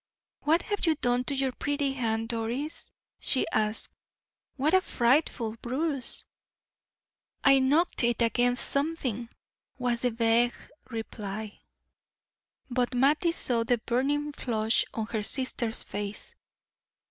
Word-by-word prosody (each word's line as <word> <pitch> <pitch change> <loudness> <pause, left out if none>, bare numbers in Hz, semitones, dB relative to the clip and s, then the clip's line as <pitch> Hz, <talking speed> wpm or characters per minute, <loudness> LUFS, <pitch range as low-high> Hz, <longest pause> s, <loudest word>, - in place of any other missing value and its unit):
"What 320 +3 +2
have 410 -4 -1
you 320 - +4
done 245 -3 0
to 280 - -2
your 270 -1 0
pretty 285 +1 -1
hand, 225 -3 -2
Doris?" 240 +6 -3 0.3
she 260 - +1
asked. 215 0 0 0.6
"What 290 +5 +1
a 375 - +6
frightful 240 - +1
bruise!" 270 +1 0 1.2
"I 275 -1 +6
knocked 290 +4 +2
it 235 -1 +1
against 245 +2 +2
something," 280 -6 -1 0.5
was 245 -2 -1
the 250 - +2
vague 230 +1 +2 0.3
reply. 215 -2 -6 1.1
But 250 0 -1
Mattie 290 +7 +3
saw 240 -8 +2
the 240 +1 +2
burning 280 +6 -1
flush 225 -5 0
on 225 - -3
her 220 -1 -3
sister's 235 -1 +2
face. 205 0 -6
245 Hz, 120 wpm, -28 LUFS, 230-280 Hz, 1.2 s, a